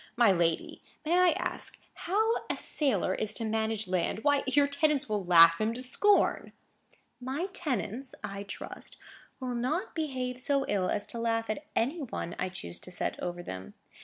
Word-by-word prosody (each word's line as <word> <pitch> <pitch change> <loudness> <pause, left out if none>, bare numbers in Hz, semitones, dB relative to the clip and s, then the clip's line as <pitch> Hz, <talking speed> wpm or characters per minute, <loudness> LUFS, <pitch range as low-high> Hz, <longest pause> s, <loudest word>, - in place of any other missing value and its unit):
My 235 -4 +5
lady, 170 -3 0 0.2
may 330 +3 +2
I 365 0 +6
ask - - -2 0.2
how 435 +6 +1 0.2
a - - -1
sailor 240 - 0
is 215 +1 +1
to 230 - -1
manage 220 -1 -1
land? 185 +4 -1
Why, 285 -1 +3
your 285 +2 +4
tenants 295 0 +1
will 210 -2 -1
laugh 165 -1 +7
him 220 +2 0
to 255 - -4
scorn." 405 +11 +3 0.7
"My 270 +9 -3
tenants, 255 - -3
I 200 0 -5
trust, 200 0 -8 0.4
will 255 -2 -3
not 255 +9 -1
behave 255 -5 -3
so 275 +1 +1
ill 195 -3 0
as 205 - -1
to 235 - -7
laugh 225 -1 0
at 290 +7 -6
any 290 +9 0
one 225 -9 -5
I 185 - -1
choose 85 - -8
to - - -9
set 180 - -3
over 175 0 -4
them. 95 - -8
235 Hz, 175 wpm, -30 LUFS, 195-285 Hz, 0.7 s, laugh